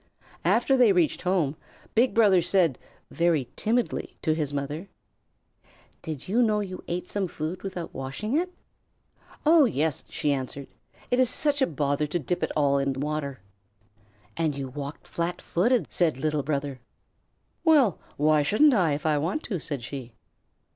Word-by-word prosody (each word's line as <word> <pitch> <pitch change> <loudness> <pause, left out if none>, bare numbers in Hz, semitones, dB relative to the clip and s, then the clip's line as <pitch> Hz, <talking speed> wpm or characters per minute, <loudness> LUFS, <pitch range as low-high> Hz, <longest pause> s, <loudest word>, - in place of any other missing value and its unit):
After 270 - +3
they 245 -5 +5
reached 175 -5 +2
home, 180 -6 +1 0.4
Big 240 +3 +3
Brother 205 -6 +5
said, 170 -6 +2 0.3
very 165 -6 +1
timidly, 235 +2 -1
to 155 - +2
his 155 -3 -2
mother: 145 +6 -4 1.1
"Did 155 -4 -6
you 225 +6 +2
know 215 -3 +3
you 185 -3 -5
ate 175 +1 -4
some 200 -2 -1
food 165 +3 -5
without 180 -4 -6
washing 135 - -4
it?" 360 +3 0 0.9
"Oh, 315 -1 +7
yes," 155 - 0
she 145 - 0
answered; 135 +1 -5 0.4
"it 245 - +3
is 255 -2 +4
such 290 +2 +2
a 265 - +4
bother 145 -1 -1
to 155 - -1
dip 175 +3 -2
it - - -1
all 140 -2 +3
in 135 0 0
water." 145 -3 -3 0.9
"And 160 -3 0
you 135 -1 -5
walked 140 +2 -7
flat 170 +1 -3
footed," 235 +7 +1
said 165 -6 +2
Little 150 +1 0
Brother. 140 -2 -3 0.8
"Well, 285 - +4 0.2
why 150 +1 +4
shouldn't 220 - +4
I, 175 -9 +3
if 145 - -4
I 150 -2 +2
want 175 - -2
to?" 190 -7 -3
said 145 -4 -4
she. 125 -2 -7
160 Hz, 160 wpm, -26 LUFS, 145-205 Hz, 1.1 s, Oh